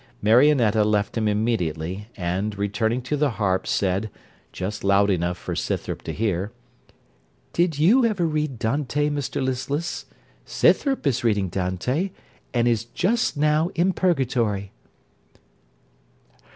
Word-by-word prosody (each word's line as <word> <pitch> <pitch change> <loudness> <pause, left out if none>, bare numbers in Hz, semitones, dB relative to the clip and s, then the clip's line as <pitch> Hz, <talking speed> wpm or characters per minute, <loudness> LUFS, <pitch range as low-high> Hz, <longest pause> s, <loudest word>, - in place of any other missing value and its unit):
Marionetta 115 -1 +4
left 105 -1 0
him 110 -2 0
immediately, 100 -4 -1
and 95 +3 -2
returning 110 +4 -1
to 140 +4 -1
the 145 0 +2
harp, 95 -3 0
said, 100 +2 0 0.4
just 95 +4 -5
loud 100 +1 +4
enough 90 -1 -1
for - - -5
Scythrop - - -3
to - - -5
hear 100 -2 -1 1.0
'Did 170 -3 +1
you 205 - +5
ever 210 -7 +1
read 150 -4 -1
Dante, 145 +5 0
Mr 145 -2 -2
Listless? 140 +5 -3 0.4
Scythrop 275 - +2
is 130 -3 +1
reading 105 -5 +1
Dante, 95 - -1 0.4
and 120 -1 +1
is 115 -1 +1
just 195 - 0
now 150 +3 +2
in 180 +3 +2
Purgatory.' 120 - 0
115 Hz, 125 wpm, -24 LUFS, 100-150 Hz, 1.0 s, you